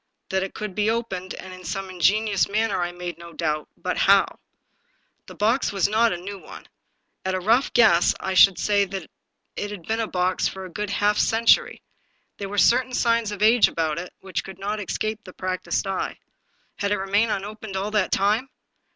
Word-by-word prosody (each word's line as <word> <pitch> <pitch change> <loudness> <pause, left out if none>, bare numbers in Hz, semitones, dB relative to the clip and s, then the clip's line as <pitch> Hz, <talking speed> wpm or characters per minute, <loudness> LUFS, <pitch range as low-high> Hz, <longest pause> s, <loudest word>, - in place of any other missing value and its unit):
That 190 0 0
it 190 - -5
could 210 -3 -5
be 210 +2 +1
opened, 195 -6 -3
and 185 0 -9
in 185 0 -11
some 190 +3 -4
ingenious 195 +2 +2
manner, 210 -2 0
I 175 0 -1
made 175 -1 -7
no 170 0 -11
doubt 155 -2 -2
— - - -45
but - - -1
how? - - +3 0.9
The - - -11
box 225 +6 +1
was 195 -2 +1
not 225 +2 +3
a 175 - -2
new 195 +3 -7
one. - - -12 0.6
At 190 0 -1
a - - -1
rough 230 +8 +2
g^ess 205 -8 +5
I 190 - -3
should 190 0 +7
say 205 -1 +2
that 190 -3 -7 0.4
it 205 - -3
had 205 -4 -8
been 225 +1 -1
a 225 - -1
box 180 -1 0
for 190 0 -6
a 185 - -10
good 210 +3 -4
half 205 +1 +1
century; 225 +1 +3 0.6
there 200 -1 -4
were 205 - -5
certain 255 +4 +4
signs 230 -3 +1
of 205 0 -3
age 225 +1 +6
about 160 -1 -1
it 180 - -7
which 190 -3 -4
could 190 -1 -10
not 205 +2 -3
escape 215 +2 -3
a 185 - -10
practiced 185 +2 -2
eye. 195 -1 -3 0.6
Had 200 0 -1
it 205 - +2
remained 200 +4 +1
unopened 210 0 -5
all 200 +2 -2
that 210 -3 +1
time 215 +7 +1
200 Hz, 205 wpm, -24 LUFS, 185-215 Hz, 0.9 s, should